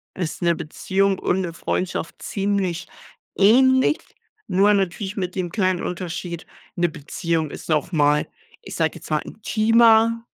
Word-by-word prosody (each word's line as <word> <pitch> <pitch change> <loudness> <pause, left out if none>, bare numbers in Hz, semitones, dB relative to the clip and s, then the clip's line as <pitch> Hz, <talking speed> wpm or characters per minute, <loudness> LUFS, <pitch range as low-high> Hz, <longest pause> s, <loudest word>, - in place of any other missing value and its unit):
ist 175 -2 -4
'ne 170 -1 +2
Beziehung 195 +5 -1
und 190 +1 0
'ne 170 -2 -4
Freundschaft 175 0 -3
ziemlich 195 -3 -2 0.5
ähnlich. 260 +8 +4 0.5
Nur 200 +3 +4
natürlich 195 +1 -1
mit 180 -3 -3
dem 180 -2 -2
kleinen 185 -4 0
Unterschied, 175 -1 -5 0.3
'ne 175 0 +1
Beziehung 160 +1 -3
ist - - -10
noch 150 +1 0
mal, 150 -1 +3 0.3
ich - - -9
sage - - 0
jetzt - - -11
mal, - - +1
intimer. 230 +1 +3
185 Hz, 140 wpm, -22 LUFS, 170-205 Hz, 0.5 s, ähnlich